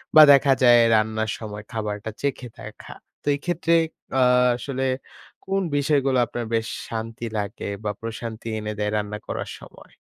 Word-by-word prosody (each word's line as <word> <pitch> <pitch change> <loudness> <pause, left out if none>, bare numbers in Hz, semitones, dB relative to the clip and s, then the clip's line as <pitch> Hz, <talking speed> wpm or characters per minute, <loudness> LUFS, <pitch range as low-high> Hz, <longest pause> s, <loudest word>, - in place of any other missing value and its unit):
বা 155 - +11
দেখা 140 0 +5
যায় 120 -1 +8
রান্নার 110 0 +1
সময় 105 -2 -7
খাবারটা 105 -1 -4
চেখে 140 -3 -2
দেখা। - - -10 0.3
তো - - -32
এই 140 - -8
ক্ষেত্রে 170 -1 +1 0.5
আ - - +4 0.3
আসলে 130 +1 -4 0.6
কোন 195 0 0 0.2
বিষয়গুলো 140 -2 +2
আপনার 120 0 -5
বেশ 115 0 0 0.2
শান্তি 115 +1 -5
লাগে 100 0 -4 0.2
বা 105 - -1
প্রশান্তি 115 0 -6
এনে 105 0 -4
দেয় 105 0 0
রান্না 105 0 -3
করার - - -4
সময়? - - -15
115 Hz, 155 wpm, -24 LUFS, 110-135 Hz, 0.6 s, বা